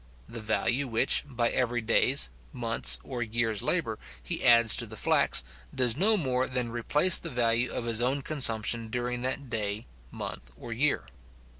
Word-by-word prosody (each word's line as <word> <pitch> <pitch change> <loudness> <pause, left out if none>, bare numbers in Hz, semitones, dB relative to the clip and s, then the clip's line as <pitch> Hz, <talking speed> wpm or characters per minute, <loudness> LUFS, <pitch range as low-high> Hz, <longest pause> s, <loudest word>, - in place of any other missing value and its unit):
The 115 0 -7
value 120 +5 -1
which, 115 +2 +1
by 120 -4 -1
every 120 -1 -1
day's, 115 - +2 0.2
month's, 115 -2 +1
or 125 -2 -6
year's 115 -2 -2
labour, - - -2 0.2
he 65 - -3
adds 115 -1 +6
to 115 - -1
the 110 +1 -9
flax, 65 - +2 0.3
does 125 -3 +1
no 210 +8 +2
more 130 -6 -1
than 125 -2 -3
replace 150 +9 +4
the 165 - -7
value 120 -2 0
of 115 - -4
his 115 0 +1
own 135 +3 -1
consumption 115 -6 +1
during 125 +1 -4
that 130 +2 -4
day, 105 0 -3 0.3
month, - - -8
or 115 - -8
year. 140 +6 -1
120 Hz, 165 wpm, -27 LUFS, 115-130 Hz, 0.3 s, adds